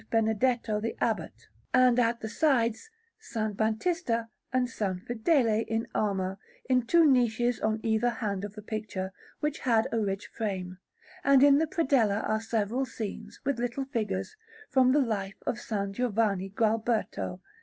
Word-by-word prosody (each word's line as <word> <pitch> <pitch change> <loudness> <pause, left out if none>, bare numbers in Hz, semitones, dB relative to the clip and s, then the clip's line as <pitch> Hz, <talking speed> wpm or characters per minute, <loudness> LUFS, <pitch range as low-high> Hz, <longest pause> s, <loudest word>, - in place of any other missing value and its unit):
Benedetto 225 0 +1
the 230 - -3
Abbot, - - -2 0.3
and, 250 -1 +5
at 235 -1 +1
the 220 - -3
sides, 240 - +1 0.3
S. 220 -2 -3
Batista 230 - 0 0.3
and 255 -1 +2
S. 255 - -14
Fedele 220 - +1
in 225 0 -1
armour, 195 -2 -1 0.3
in 250 -2 +2
two 335 +3 +5
niches 245 -3 +3
on 220 0 0
either 225 +2 +2
hand 205 -5 -3
of 205 0 -6
the 210 - -9
picture, 205 -3 -4 0.3
which 300 -1 -1
had 230 -3 +2
a 230 - +1
rich 195 -2 -2
frame; 185 -4 -4 0.4
and 275 -3 +6
in 285 0 +7
the 320 - +1
predella 260 - +2
are 215 0 0
several 225 +3 -1
scenes, 220 -5 -6
with 275 -3 0
little 245 +3 -2
figures, 225 - -3 0.4
from 255 -2 +5
the 290 +2 +4
Life 200 -5 -2
of - - -1
S. - - -13 0.2
Giovanni 205 -4 0
Gualberto. 220 -3 0
225 Hz, 155 wpm, -29 LUFS, 210-255 Hz, 0.4 s, in